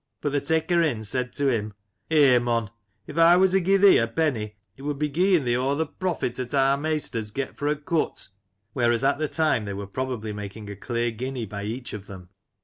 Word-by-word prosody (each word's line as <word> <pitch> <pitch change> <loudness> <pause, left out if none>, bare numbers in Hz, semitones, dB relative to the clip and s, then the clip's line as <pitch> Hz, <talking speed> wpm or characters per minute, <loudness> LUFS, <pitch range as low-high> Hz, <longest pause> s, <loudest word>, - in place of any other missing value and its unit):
But 145 - -2
th' 145 0 -1
taker 160 +2 +2
in 130 -10 0
said 125 +3 -2
to 140 -1 +1
him: 110 -4 -1 0.2
* - - -50
Eh 140 -6 +5
mon! 115 -3 -1 0.3
if 165 - -5
I 170 +2 +7
wur 190 +1 +5
to 190 +1 +2
gie 195 +3 +3
thee 195 0 +7
a 115 - +1
penny 115 -6 -1 0.2
it - - -15
would 145 0 -3
be 150 +1 0
gieing 180 +1 +3
thee 120 0 +1
o 130 +3 0
th* 160 -1 -1
profit 175 -10 -2
'at 125 +2 -3
our 135 0 +4
maisters 145 -7 -2
get 135 +4 -4
fro* 145 +1 0
a - - -6
cut! 150 +2 -2 0.4
(whereas 120 -1 +1
at 140 +1 +2
the 155 - 0
time 155 -9 +1
they 100 -1 -4
were 100 0 -5
probably 115 0 -4
making 105 0 -7
a - - -7
clear 120 +3 -2
guinea 125 +1 -4
by 100 0 -6
each 120 +3 -5
of 100 -1 -7
them.) 90 -2 -11
130 Hz, 230 wpm, -25 LUFS, 115-155 Hz, 0.4 s, I